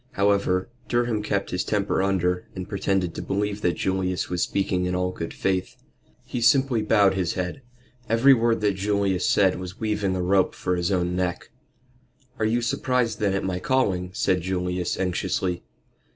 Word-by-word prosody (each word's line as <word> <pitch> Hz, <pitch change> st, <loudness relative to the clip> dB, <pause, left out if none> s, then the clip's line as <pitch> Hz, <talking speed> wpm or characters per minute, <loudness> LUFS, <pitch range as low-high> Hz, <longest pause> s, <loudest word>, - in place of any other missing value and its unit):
However, 100 Hz, -2 st, +1 dB, 0.2 s
Durham 120 Hz, -3 st, 0 dB
kept 100 Hz, -1 st, -2 dB
his 90 Hz, -, -1 dB
temper 100 Hz, -2 st, 0 dB
under, 90 Hz, -2 st, 0 dB
and 95 Hz, -1 st, -5 dB
pretended 95 Hz, -3 st, -1 dB
to -, -, -5 dB
believe 105 Hz, +1 st, -2 dB
that 90 Hz, -, +1 dB
Julius 95 Hz, -1 st, -1 dB
was 90 Hz, -1 st, -1 dB
speaking 95 Hz, -2 st, 0 dB
in 90 Hz, 0 st, -1 dB
all 90 Hz, 0 st, 0 dB
good 85 Hz, -2 st, -5 dB
faith. 95 Hz, -1 st, -1 dB, 0.5 s
He 125 Hz, -, -4 dB
simply 130 Hz, -1 st, +3 dB
bowed 105 Hz, -2 st, +4 dB
his 90 Hz, -3 st, -1 dB
head. 90 Hz, +8 st, -3 dB, 0.5 s
Every 120 Hz, +5 st, +6 dB
word 115 Hz, -2 st, +2 dB
that 105 Hz, -1 st, +2 dB
Julius 100 Hz, -1 st, 0 dB
said 95 Hz, -3 st, +3 dB
was 90 Hz, +3 st, -8 dB
weaving 105 Hz, -3 st, -1 dB
a 90 Hz, -, -1 dB
rope 95 Hz, +1 st, +2 dB
for 90 Hz, -, -1 dB
his 90 Hz, +1 st, -1 dB
own 90 Hz, -1 st, 0 dB
neck. 90 Hz, +4 st, -2 dB, 0.9 s
"Are 110 Hz, -, +1 dB
you 115 Hz, +2 st, +1 dB
surprised 120 Hz, -2 st, 0 dB
then 100 Hz, -2 st, +1 dB
at 95 Hz, -, -1 dB
my 95 Hz, -1 st, -2 dB
calling?" 95 Hz, -6 st, 0 dB
said 90 Hz, 0 st, +1 dB
Julius, 90 Hz, 0 st, -2 dB
anxiously. 90 Hz, -1 st, -1 dB
95 Hz, 170 wpm, -24 LUFS, 90-105 Hz, 0.9 s, Every